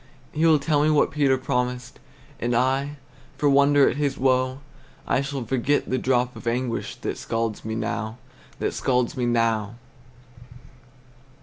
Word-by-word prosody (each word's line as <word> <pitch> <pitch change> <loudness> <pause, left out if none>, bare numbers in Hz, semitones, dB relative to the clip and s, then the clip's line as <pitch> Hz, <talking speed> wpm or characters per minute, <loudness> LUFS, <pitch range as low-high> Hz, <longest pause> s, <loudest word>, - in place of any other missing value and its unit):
He 160 +2 +2
will 160 -1 +6
tell 145 0 +1
me 150 - +3
what 150 -1 +3
Peter 140 -3 +2
promised, 125 -1 -3 0.4
And 120 +1 0
I, 135 +4 0 0.4
for 145 - +1
wonder 140 0 +5
at - - 0
his 145 -2 -1
woe, 130 0 +1 0.5
I - - +2
shall 140 -3 -4
forget 130 +5 0
the 130 - +1
drop 125 -1 +1
of - - -9
anguish 120 0 -2
That - - -5
scalds 115 -2 -3
me 110 0 -4
now, 110 0 -3 0.4
that - - -2
scalds 125 -2 0
me 125 -2 -1
now. 115 -2 0
130 Hz, 150 wpm, -24 LUFS, 120-140 Hz, 0.5 s, will